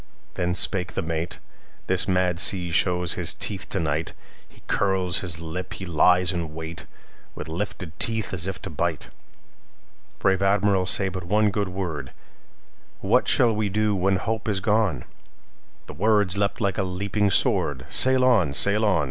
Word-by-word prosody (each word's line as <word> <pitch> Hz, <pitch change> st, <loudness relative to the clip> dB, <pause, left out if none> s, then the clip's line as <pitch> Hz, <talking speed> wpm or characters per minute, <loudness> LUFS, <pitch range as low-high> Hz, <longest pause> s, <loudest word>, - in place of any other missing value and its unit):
Then 90 Hz, 0 st, -1 dB
spake 95 Hz, -1 st, 0 dB
the 95 Hz, -, -2 dB
mate:"This 85 Hz, +3 st, -4 dB
mad 90 Hz, -2 st, +1 dB
sea 90 Hz, 0 st, +1 dB
shows 90 Hz, 0 st, +1 dB
his -, -, 0 dB
teeth -, -, -3 dB
to -, -, -2 dB
night. 80 Hz, 0 st, -2 dB, 0.4 s
He -, -, -21 dB
curls 95 Hz, -3 st, +1 dB
his 85 Hz, -4 st, -2 dB
lip, 85 Hz, +3 st, -6 dB
he 95 Hz, -, -6 dB
lies 90 Hz, +1 st, +3 dB
in 85 Hz, -3 st, -4 dB
wait, 80 Hz, +1 st, -7 dB, 0.5 s
With 75 Hz, -, -7 dB
lifted 90 Hz, 0 st, -5 dB
teeth, 110 Hz, -4 st, -2 dB
as 90 Hz, 0 st, -2 dB
if 95 Hz, -, -4 dB
to -, -, -6 dB
bite! 75 Hz, -, -2 dB, 1.1 s
Brave 95 Hz, -1 st, +1 dB
Admiral, 100 Hz, -1 st, +2 dB
say 95 Hz, -, +2 dB
but 90 Hz, -2 st, -6 dB
one 105 Hz, +3 st, +2 dB
good 100 Hz, -1 st, -2 dB
word:What 85 Hz, -8 st, -4 dB
shall 115 Hz, -2 st, +3 dB
we 105 Hz, -1 st, -1 dB
do 105 Hz, +1 st, +1 dB
when 95 Hz, +1 st, +1 dB
hope 110 Hz, +3 st, -2 dB
is 100 Hz, -2 st, 0 dB
gone?"The 105 Hz, -, -4 dB
words 105 Hz, +2 st, +2 dB
leapt 100 Hz, 0 st, -1 dB
like 100 Hz, -3 st, -1 dB
a -, -, +3 dB
leaping 100 Hz, +2 st, -1 dB
sword:"Sail 100 Hz, -, +2 dB
on! 100 Hz, -, +3 dB
sail 100 Hz, +6 st, +3 dB
on! 100 Hz, -5 st, +3 dB
95 Hz, 155 wpm, -24 LUFS, 85-100 Hz, 1.1 s, lies